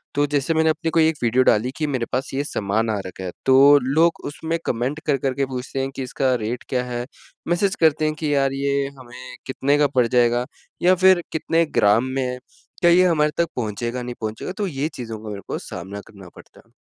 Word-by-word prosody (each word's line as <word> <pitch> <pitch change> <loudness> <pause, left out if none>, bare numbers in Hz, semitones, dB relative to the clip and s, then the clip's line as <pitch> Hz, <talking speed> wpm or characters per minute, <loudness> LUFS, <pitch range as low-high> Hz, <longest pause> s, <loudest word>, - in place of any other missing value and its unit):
तो 145 0 +3
जैसे 145 +2 0
मैंने 160 0 +3
अपने 165 +1 -1
कोई 160 -1 +4
एक 160 - 0
वीडियो 125 +2 +3
डाली 120 +3 +2
कि 155 -2 -1
मेरे 130 -4 -1
पास 130 +2 -2
ये 140 +2 -1
सामान 110 -2 -1
आ 105 - 0
रखा 95 0 -8
है, 90 - -4
तो 135 +2 +7
लोग 160 +6 +2
उसमें 160 +3 -3
कमेंट 125 +6 -2
कर-कर 135 -3 0
के 135 +1 0
पूछते 130 +1 -5
हैं 135 0 -2
कि 135 - -4
इसका 130 0 0
रेट 120 +3 -3
क्या 125 -1 0
है, 120 0 -4 0.4
मैसेज 185 +3 +1
करते 155 0 +4
हैं 155 - +1
कि, 150 -2 -2
"यार, 135 -1 +2
ये 140 0 0
हमें 125 +1 -11
कितने 140 +2 +1
का 145 -1 +4
पड़ 125 -2 +4
जाएगा, 120 0 +2 0.4
या 185 +1 +5
फिर 185 -1 +5
कितने 165 +1 +1
ग्राम 105 +4 +4
में 135 - 0
है, 125 0 -3 0.4
क्या 175 -1 +5
ये 185 +1 +6
हमारे 150 -3 +2
तक 170 0 +2
पहुँचेगा, 120 +2 -3
नहीं 120 0 -6
पहुँचेगा?" 110 +10 -4
तो 205 -2 -1
ये 145 -2 -2
चीज़ों 115 -3 -6
का 105 - -7
मेरे 100 -1 -6
को - - -3
सामना 95 +3 -7
करना 100 -4 -13
पड़ता - - -16
है। - - -31
135 Hz, 225 wpm, -22 LUFS, 120-155 Hz, 0.4 s, तो